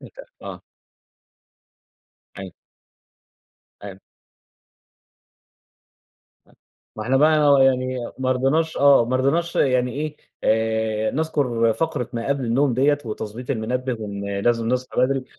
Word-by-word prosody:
ميت -, -, -13 dB, 0.3 s
آه. -, -, -9 dB, 1.8 s
أي 95 Hz, -1 st, -7 dB, 1.3 s
أيو 95 Hz, -2 st, -9 dB, 3.0 s
ما 110 Hz, -, -5 dB
إحنا 130 Hz, +3 st, +1 dB
بقى 150 Hz, 0 st, +4 dB
و 140 Hz, -, +5 dB
يعني 130 Hz, -1 st, +2 dB, 0.2 s
ما 130 Hz, 0 st, +1 dB
رضيناش 145 Hz, +6 st, 0 dB
آه، 140 Hz, -3 st, +5 dB
ما 125 Hz, +2 st, -1 dB
رضيناش 165 Hz, +6 st, 0 dB
يعني 125 Hz, -2 st, +1 dB
إيه، 150 Hz, +1 st, -4 dB, 0.3 s
آآ 110 Hz, -1 st, 0 dB
نذكُر 130 Hz, -7 st, 0 dB
فقرة 150 Hz, -2 st, -2 dB
ما 115 Hz, -1 st, -4 dB
قبْل 140 Hz, -2 st, -1 dB
النوم 125 Hz, +3 st, +1 dB
دِيّة 145 Hz, +4 st, +2 dB
وتضبيط 110 Hz, +3 st, -6 dB
المنبه 125 Hz, +1 st, -2 dB
وإن 100 Hz, -1 st, -5 dB
لازم 115 Hz, +1 st, 0 dB
نصحى 125 Hz, 0 st, -1 dB
بدري، 130 Hz, +1 st, +1 dB
130 Hz, 115 wpm, -22 LUFS, 115-140 Hz, 3.0 s, و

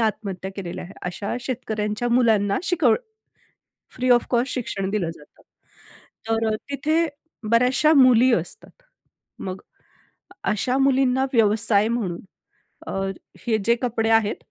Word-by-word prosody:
आत्महत्या 200 Hz, -4 st, -2 dB
केलेल्या 180 Hz, -2 st, -6 dB
आहे. 185 Hz, -, -11 dB
अशा 190 Hz, +5 st, -4 dB
शेतकऱ्यांच्या 220 Hz, -2 st, -3 dB
मुलांना 220 Hz, -5 st, +3 dB
शिकवण 360 Hz, -1 st, +2 dB, 1.0 s
फ्री 255 Hz, 0 st, 0 dB
ऑफ 240 Hz, -1 st, +4 dB
कॉस्ट 245 Hz, +1 st, +1 dB
शिक्षण 195 Hz, -6 st, -3 dB
दिलं 195 Hz, -6 st, -1 dB
जातं. 150 Hz, -, -19 dB, 0.9 s
तर 225 Hz, 0 st, +1 dB
अ, -, -, 0 dB, 0.2 s
तिथे 310 Hz, +4 st, +1 dB, 0.4 s
बऱ्याचशा 250 Hz, +6 st, +4 dB
मुली 255 Hz, -1 st, +6 dB
असतात. 175 Hz, -, -6 dB, 0.6 s
मग 185 Hz, 0 st, -6 dB, 0.8 s
अशा 250 Hz, +5 st, 0 dB
मुलींना 265 Hz, -1 st, +3 dB
व्यवसाय 215 Hz, -1 st, +3 dB
म्हणून 210 Hz, -8 st, -2 dB, 0.7 s
अ, -, -, -5 dB, 0.6 s
हे 225 Hz, -2 st, +2 dB
जे 235 Hz, -, +5 dB
कपडे 225 Hz, -2 st, 0 dB
आहेत, 215 Hz, -2 st, 0 dB
225 Hz, 120 wpm, -23 LUFS, 205-255 Hz, 1.0 s, मुली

